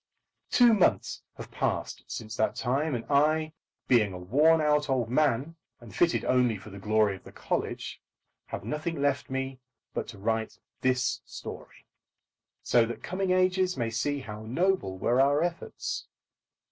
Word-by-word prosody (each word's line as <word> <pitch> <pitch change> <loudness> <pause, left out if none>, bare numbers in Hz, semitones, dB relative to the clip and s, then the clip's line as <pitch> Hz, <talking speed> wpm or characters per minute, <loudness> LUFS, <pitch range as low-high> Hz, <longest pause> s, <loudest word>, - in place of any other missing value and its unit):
Two 240 -2 +6
months 200 -5 +2 0.2
have - - -9
passed - - -2
since 110 -1 -6
that 110 - +1
time, 135 +4 0
and 115 - -4
I, 155 +2 +2 0.3
being 110 -6 +4
a - - -6
worn 145 - +4
out 150 -1 +2
old 125 -4 0
man, 145 +3 +1 0.2
and 120 -3 -13
fitted 170 -1 +2
only 125 -3 +3
for 105 +2 -12
the 100 - -9
glory 105 0 +2
of 95 - -14
the - - -12
college, - - -3 0.5
have - - -5
nothing 150 +7 -3
left 140 0 0
me 135 0 -3 0.3
but - - -3
to 110 - -9
write 110 +2 -1 0.2
this 130 -1 +1
story, - - -10 0.8
so 120 - +4
that 120 - -7
coming 190 +1 -2
ages 185 -1 +2
may 115 -2 -1
see 140 +5 -1
how 105 -3 -8
noble 125 - 0
were 120 +7 +2
our 145 +3 +3
efforts. 175 0 -4
130 Hz, 160 wpm, -28 LUFS, 115-155 Hz, 0.8 s, Two